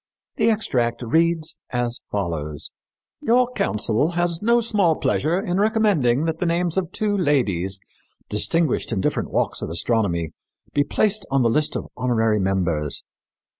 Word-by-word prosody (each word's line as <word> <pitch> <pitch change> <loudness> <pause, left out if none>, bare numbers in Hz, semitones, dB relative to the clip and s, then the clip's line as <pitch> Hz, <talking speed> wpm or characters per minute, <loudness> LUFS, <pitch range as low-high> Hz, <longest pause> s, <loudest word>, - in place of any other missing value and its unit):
The - - +3
extract 125 - 0
reads 160 +5 +1
as 120 -1 -1
follows: 80 -7 -3 0.5
"Your 245 +2 +3
council 115 - 0
has 175 -1 0
no 235 +2 +4
small 205 -8 +2
pleasure 165 +4 0
in 180 -1 -1
recommending 200 - +2
that 160 0 -2
the 180 - 0
names 170 0 0
of 185 -4 -1
two 210 -1 -1
ladies 100 - 0 0.5
distinguished 115 +12 +1
in 105 - 0
different - - -1
walks - - -1
of - - -4
astronomy 85 -2 0 0.4
be 145 - +3
placed 205 +6 0
on 135 -1 +2
the 115 - +3
list 150 +5 +1
of - - -3
honorary 115 -4 +1
members. 90 -6 0
145 Hz, 145 wpm, -22 LUFS, 105-180 Hz, 0.5 s, no